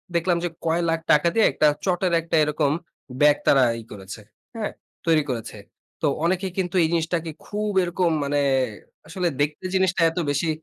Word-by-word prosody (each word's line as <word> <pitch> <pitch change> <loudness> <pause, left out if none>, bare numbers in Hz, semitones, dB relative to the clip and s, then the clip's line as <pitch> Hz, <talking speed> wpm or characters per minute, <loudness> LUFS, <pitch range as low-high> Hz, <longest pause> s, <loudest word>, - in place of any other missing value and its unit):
দেখলাম 170 +1 +2
যে 175 - 0 0.2
কয় 165 +1 +1
লাখ 165 0 +1
টাকা 150 +3 +4
দিয়ে 225 - +4
একটা 150 - +3 0.2
চটের 180 -1 +1
একটা 165 0 -2
এরকম 150 -1 +1 0.5
ব্যাগ 150 0 +6
তারা 135 -2 +6 0.2
ই - - -13
করেছে। 100 +1 -9 0.3
হ্যাঁ? 220 -2 -3 0.3
তৈরি 160 -2 +3
করেছে। 115 -3 -4 0.4
তো 155 - +2 0.2
অনেকে 190 +2 0
কিন্তু 185 -1 -2
এই - - +3
জিনিসটাকে 165 0 -1
খুব 210 0 -3
এরকম 175 -1 0
মানে 145 0 0 0.7
আসলে 180 +2 -2
দেখতে 150 +4 -2
জিনিসটা 185 -2 +2
এত 165 - -14
বেশি 155 +3 0
165 Hz, 170 wpm, -23 LUFS, 150-180 Hz, 0.7 s, ব্যাগ